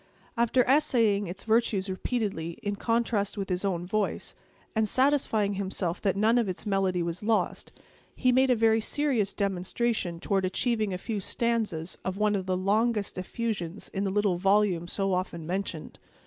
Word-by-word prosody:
After 235 +2 +3
essaying 230 -8 +3
its 180 +2 -7
virtues 220 -3 +2
repeatedly, 190 -4 -3
in 205 -1 -1
contrast 225 -2 0
with 195 -1 -3
his 180 +1 -1
own 180 -3 -1
voice, 210 +3 -2 0.4
and, 220 -1 +2
satisfying 255 -7 +2
himself 190 -3 -3
that 195 -2 +1
none 220 +4 +3
of 225 -5 0
its 185 - -5
melody 190 -3 +1
was 170 +1 -3
lost, 220 +1 0 0.4
he 255 - +3
made 260 +1 +4
a 250 - +5
very 225 0 +3
serious 250 -6 +1
demonstration 195 -1 -1
toward 195 +2 0
achieving 215 +2 0
a 180 - -2
few 210 +3 -3
stanzas 205 -6 -2
of 185 0 -3
one 210 0 +2
of 190 -2 -2
the 185 -1 +1
longest 210 +2 +1
effusions 195 -2 -4
in 195 - -3
the 195 - 0
little 200 -2 +1
volume 195 -3 +2
so 195 +1 -1
often 180 -3 -2
mentioned. 170 - -4
200 Hz, 165 wpm, -28 LUFS, 185-225 Hz, 0.4 s, a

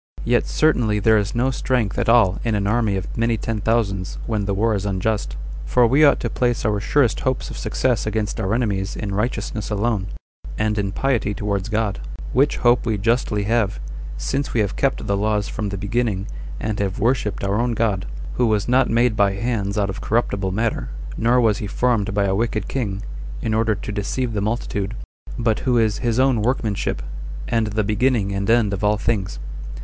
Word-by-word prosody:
Yet - - +2
certainly 120 -9 +2
there 110 +1 +4
is 100 +1 -3
no 125 +3 +2
strength 125 -6 0
at - - +1
all 110 -5 +5
in 115 -2 0
an 100 -1 0
army 110 -1 +1
of 95 - -5
many 115 0 +1
ten 110 -1 -3
thousands, 100 -5 0
when 110 -3 -1
the 100 - 0
war 110 +3 +2
is 100 -2 -1
unjust; 100 - -1 0.3
for 120 - +3
we 135 +6 +4
ought 145 - +6
to - - -1
place 120 -3 0
our 105 -1 +1
surest 125 +1 +2
hopes 130 0 -1
of - - -7
success 125 -5 0
against 110 -1 -1
our 95 +3 0
enemies 100 -5 -1
in 100 -2 -4
righteousness 105 -1 -2
alone, 105 -2 0 0.5
and 110 0 0
in 100 -1 -1
piety 110 -4 0
towards 100 -1 -2
God; 110 -3 0 0.3
which 140 +3 +3
hope 120 0 +3
we 110 -3 0
justly 105 -1 +1
have, 105 - +1 0.4
since 140 0 -2
we 115 - +4
have 100 - -1
kept - - 0
the 100 - +1
laws 105 0 0
from 105 -2 -3
the 100 - -4
beginning, 100 0 -1 0.3
and 110 -2 -2
have 95 -2 -1
worshipped 115 -2 0
our 100 +2 +1
own 120 0 0
God, 105 -5 0 0.3
who 125 - +3
was 105 -2 +1
not 125 +1 +3
made 120 0 +3
by 100 -2 +3
hands 100 -1 -2
out 100 -2 +1
of 95 - -7
corruptible 100 -4 0
matter; 105 - -1 0.3
nor 120 +2 +3
was 110 -4 +3
he 105 - -3
formed 110 -2 +1
by 100 0 +1
a 95 - +1
wicked 110 -1 -1
king, 105 -6 -3 0.4
in 110 - -1
order 110 -1 +2
to 105 - -6
deceive 115 +4 -2
the 105 - -1
multitude; 105 -1 -2 0.4
but 115 -3 +1
who 125 -3 +1
is 110 -2 +2
his 120 -1 0
own 130 -4 +3
workmanship, 110 - -1 0.5
28 - - 0
and 110 - 0
the 110 0 +1
beginning 105 0 +1
and 100 +1 -2
end 115 -3 +3
of 100 - -3
all 105 +1 +3
things. 105 -3 -1
110 Hz, 200 wpm, -22 LUFS, 100-120 Hz, 0.5 s, ought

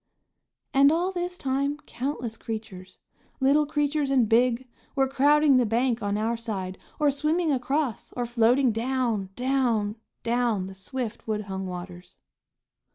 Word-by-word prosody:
And 280 +1 +6
all 350 +4 +1
this 355 -1 -4
time 275 +1 -1
countless 250 -5 -4
creatures, 215 -6 -7 0.4
little 290 +3 +3
creatures 295 -1 0
and 260 -5 +3
big, 240 +3 +2 0.3
were 270 -1 +3
crowding 285 +1 +4
the 250 - +3
bank 235 +1 +1
on 205 0 -1
our 225 +2 0
side 195 -5 -4 0.2
or 295 -1 +4
swimming 310 +3 +1
across 270 -2 -1
or 245 - -2
floating 240 +2 +3
down, 230 -4 -1
down, 245 -5 0 0.3
down 235 -5 +1
the 190 - -8
swift, 235 +4 -5
woodhung 200 -3 -3
waters. 180 0 -8
245 Hz, 135 wpm, -26 LUFS, 220-280 Hz, 0.4 s, And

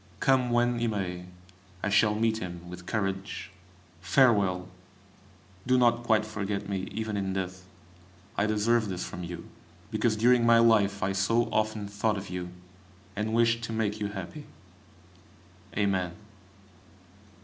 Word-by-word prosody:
Come 130 -2 +3
when 120 0 +2
he 120 - +1
may, 90 -4 -3 0.6
I 100 - +1
shall 105 +1 +4
meet 110 0 +1
him 90 -2 -7
with 90 0 -10
courage. 95 -3 -3 0.5
Farewell! 100 -8 +3 1.0
Do 130 0 +4
not 120 -1 +4
quite 110 -2 +2
forget 105 -2 -3
me, 95 -1 -3
even 110 -1 -3
in 95 -1 -2
death; 95 -1 -4 0.7
I 105 - +1
deserve 110 +1 +2
this 90 -1 -3
from 90 - -7
you, 85 0 -7 0.4
because 110 0 +1
during 120 +2 +4
my 115 0 +6
life 105 -3 +4
I 95 - +1
so 100 +5 +2
often 110 -1 0
thought 105 +1 0
of 95 -2 -7
you, 90 -1 -4 0.7
and 105 +2 -1
wished 115 0 +3
to 115 - -5
make 110 -1 -1
you 105 - -1
happy. 100 - -7 1.3
Amen! 95 -4 +1
105 Hz, 140 wpm, -28 LUFS, 95-115 Hz, 1.3 s, my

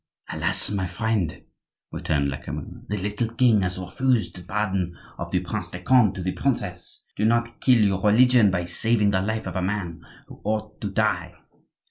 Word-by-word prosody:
"Alas! 95 +6 0
my 95 -2 -1
friend," 110 -5 -1 0.5
returned 70 -3 0
Lecamus, 70 - -7
"the 105 - -1
little 105 +4 -1
king 115 -5 +4
has 90 0 -1
refused 120 +5 0
the 90 - -9
pardon 95 -2 -2 0.2
of 85 - -4
the 90 0 +1
Prince 90 0 -4
de 90 +1 -8
Conde 110 0 +4
to 95 - -4
the 95 - 0
princess. 100 -10 -3
Do 105 - -2
not 120 +1 +1
kill 125 -4 +5
your 95 -2 +1
religion 115 +1 +5
by 90 -2 -1
saving 105 +3 +2
the 95 -1 +2
life 110 +3 -2
of - - -5
a 95 - 0
man 90 -4 -3 0.3
who - - -13
ought 110 0 -3
to 105 - -2
die." 90 -4 0
100 Hz, 180 wpm, -25 LUFS, 90-110 Hz, 0.5 s, kill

